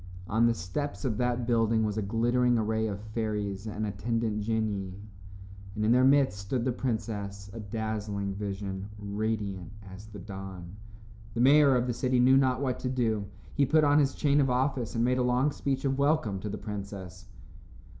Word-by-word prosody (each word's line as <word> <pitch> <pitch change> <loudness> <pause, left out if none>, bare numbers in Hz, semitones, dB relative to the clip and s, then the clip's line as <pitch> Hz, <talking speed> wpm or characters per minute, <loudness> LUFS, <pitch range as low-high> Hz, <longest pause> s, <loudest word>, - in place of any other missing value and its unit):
On 110 +6 +3
the 115 - +2
steps 145 - -4
of 110 -5 -1
that 125 -1 0
building 115 -1 +2
was 105 -1 -1
a 110 - -1
glittering 120 +4 +2
array 110 0 0
of 100 -2 -4
fairies 105 -2 -2
and 110 0 -3
attendant 110 +1 -1
genii, 100 -3 -2 0.8
and 105 - -1
in 110 - +3
their 125 +1 +5
midst 135 -6 +4
stood 115 +5 -2
the 130 - +2
princess, 100 -5 -4
a 115 - -7
dazzling 105 -2 -3
vision, 100 -1 -4
radiant 105 -2 -3 0.2
as 100 +3 -11
the 105 -1 -10
dawn. 95 -2 -8 0.6
The 115 - +1
mayor 140 +1 +6
of 125 0 +2
the 125 - -1
city 125 +1 +1
knew 130 +2 +6
not 130 -1 +3
what 130 -2 -1
to 125 - -2
do. 110 -5 0 0.3
He 145 - +2
put 155 +3 +4
on 145 0 +5
his 140 -2 +2
chain 145 0 +3
of 135 - +2
office 125 -2 0
and 115 +1 +2
made 125 +1 +2
a - - +3
long 125 +4 +2
speech 135 -1 -2
of 135 0 0
welcome 140 -9 +1
to 105 - -5
the 105 - -4
princess. 100 -2 -7
110 Hz, 185 wpm, -29 LUFS, 100-125 Hz, 0.8 s, mayor